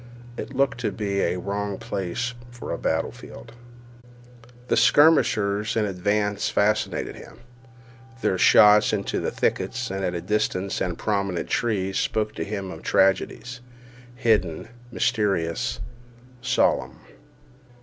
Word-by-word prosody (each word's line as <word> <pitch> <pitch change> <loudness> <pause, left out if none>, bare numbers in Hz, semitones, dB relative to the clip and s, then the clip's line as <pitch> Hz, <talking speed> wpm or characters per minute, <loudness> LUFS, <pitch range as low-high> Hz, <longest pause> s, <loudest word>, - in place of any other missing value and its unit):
It 135 - -7
looked 135 -2 +1
to 125 - -1
be 100 -2 -2
a - - 0
wrong 100 +1 -3
place 100 +8 -3 0.2
for 120 0 -8
a - - -2
battle - - 0
field. 60 - -12 1.1
The - - +2
skirmishers 110 -8 +4
in 110 -2 +2
advance 105 +2 0
fascinated 105 +1 0
him. - - -13 0.8
Their 95 - +1
shots 105 +2 +6
into 100 -2 -1
thickets - - -2
and 95 0 -3
at 90 -2 -3
distant 100 -2 -1
and 90 -2 -2
prominent 100 -4 -2
trees 100 -5 0
spoke 110 -1 -1
to - - -4
him 100 -2 -5
of - - -9
tragedies—hidden, 120 -2 -1 0.2
mysterious, 95 -9 0 0.6
solemn. 130 - +1
105 Hz, 115 wpm, -24 LUFS, 95-120 Hz, 1.1 s, shots